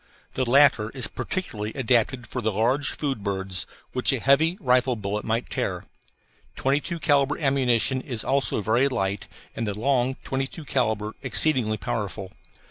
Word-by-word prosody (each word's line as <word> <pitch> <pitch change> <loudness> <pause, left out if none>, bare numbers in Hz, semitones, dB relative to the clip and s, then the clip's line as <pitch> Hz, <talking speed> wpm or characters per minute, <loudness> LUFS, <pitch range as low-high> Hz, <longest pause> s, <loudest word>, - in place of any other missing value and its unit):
The 130 -2 -1
latter 130 -5 +5
is 130 - +1
particularly 110 - -4
adapted 125 -1 +1
for 125 +2 -5
the 110 -1 0
large 120 +7 +1
food 135 -8 -3
birds, 95 -3 -2 0.3
which 125 - +4
a 135 - 0
heavy 155 +8 +3
rifle 125 -4 +2
bullet 105 -1 -3
might 115 +2 -2
tear. - - -3 0.7
Twenty 135 +2 +1
two 170 +3 -4
calibre 145 -2 +2
ammunition 130 -3 +2
is 120 -5 -5
also 135 -5 0
very 120 +6 +2
light 100 -5 -2 0.3
and 115 - -3
the 105 0 -4
long 130 +1 +1
22 135 +4 -4
calibre 110 -6 -1
exceedingly 130 -5 +1
powerful. 100 -1 -4
125 Hz, 150 wpm, -25 LUFS, 110-135 Hz, 0.7 s, latter